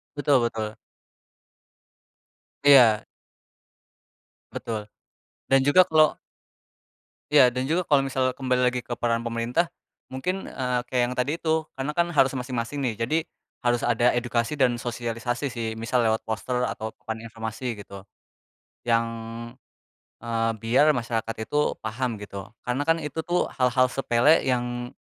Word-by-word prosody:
Betul 145 -3 +3
betul. 110 -2 -4 1.9
Iya. 120 -7 +7 1.5
Betul, 110 -2 -4 0.6
dan 135 0 +4
juga 170 +6 +5
kalau 155 -3 +4 1.1
Iya, 135 -4 +6
dan 130 +2 -2
juga 175 +2 +1
kalau 140 -2 +4
misal 130 -1 0
kembali 130 -2 0
lagi 125 - -2
ke 120 - -6
peran 115 -1 0
pemerintah, 120 +8 -1 0.4
mungkin, 180 +9 -3
eee, 125 -1 -1
kayak 125 -1 +1
yang 125 - -5
tadi 145 +6 0
itu, 160 -1 0
karena 135 +3 -2
kan 170 +1 +2
harus 135 -4 +3
masing-masing 125 +1 -3
nih. 120 -4 0
Jadi 155 +8 +1 0.4
harus 120 -1 +1
ada 120 +1 +3
edukasi 120 +4 -1
dan 130 -3 +3
sosialisasi 120 +2 -3
sih, 115 -2 -3
misal 115 +2 0
lewat 110 -1 +1
poster 125 +3 -1
atau 110 - -4
papan 110 0 -6
informasi 115 +1 -5
gitu 100 -1 -10 0.8
yang, 115 -1 +2 1.1
eee, 115 -1 0
biar 130 +7 +4
masyarakat 115 -3 -2
itu 150 0 +1
paham 115 0 -3
gitu. 100 -1 -8
Karena 125 +3 -2
kan 165 +1 +2
itu 150 0 -6
tuh 175 +1 0
hal-hal 130 0 +3
sepele 135 +4 +3
yang 120 -1 -2
125 Hz, 135 wpm, -25 LUFS, 115-140 Hz, 1.9 s, Iya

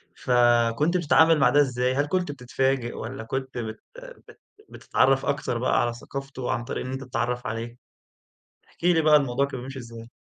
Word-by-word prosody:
فكنت 120 +6 +2
بتتعامل 160 -1 +4
مع 130 -2 +5
ده 145 +3 +4
إزاي؟ 125 -2 0
هل 145 +1 +1
كنت 180 -2 -1
بتتفاجئ 130 -1 -1
والّا 120 +1 -6
كنت 130 +2 -5
بت 110 -2 -5 0.5
بت - - -16 0.3
بتتعرّف 135 0 +1
أكتر 140 -4 -1
بقى 125 - +1
على 120 - -1
ثقافته 135 +1 -6
عن 120 - -2
طريق 120 - -5
إن 130 - -5
أنت 135 +1 -5
تتعرّف 125 -1 -3
عليه؟ 115 +2 -5 0.9
احكي 175 +1 0
لي 160 - +2
بعد 150 -1 +6
الموضوع 135 +1 0
كان 135 -3 -7
بيمشي 135 +1 -8
إزاي؟ 115 -1 -10
130 Hz, 175 wpm, -25 LUFS, 120-140 Hz, 0.9 s, بعد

